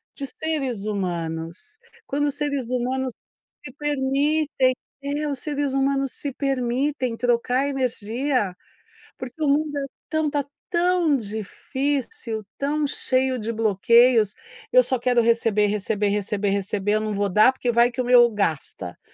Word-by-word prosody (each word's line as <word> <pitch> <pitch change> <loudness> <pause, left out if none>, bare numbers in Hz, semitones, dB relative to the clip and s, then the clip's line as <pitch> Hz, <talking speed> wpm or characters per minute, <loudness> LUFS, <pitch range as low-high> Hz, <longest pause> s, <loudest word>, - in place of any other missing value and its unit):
de 280 - -4
seres 270 -8 -3
humanos, 170 - -4 0.3
quando 290 +1 0
os 285 - -2
seres 285 -4 -1
humanos 255 +1 -1 0.5
se 260 - -8
permitem 285 -1 +1 0.3
é 290 +2 -2
os 280 -3 -3
seres 290 -2 -2
humanos 275 0 +1
se 285 - -4
permitem 260 -1 -1
trocar 245 +3 +1
energia, 250 -4 -1 0.6
porque 260 +5 -7
o 295 - +2
mundo 295 +1 +1
é 275 - -2 0.2
tão 315 -1 0
tá 285 -1 -1 0.3
tão 350 -3 +3
difícil, 240 - -3
tão 295 +2 0
cheio 260 -1 +1
de 225 0 -3
bloqueios, 225 +1 +4 0.4
eu - - +7
só 260 - -1
quero 245 0 +2
receber, 225 -2 +3
receber, 205 0 0
receber, 205 0 -1
receber, 200 +1 -1
eu 215 - +2
não 215 0 -2
vou 200 0 0
dar 210 +7 +5
porque 255 -2 -2
vai 235 +1 +4
que 245 - -3
o - - 0
meu 245 -1 +7
gasta. 155 - -2
255 Hz, 145 wpm, -23 LUFS, 215-285 Hz, 0.6 s, eu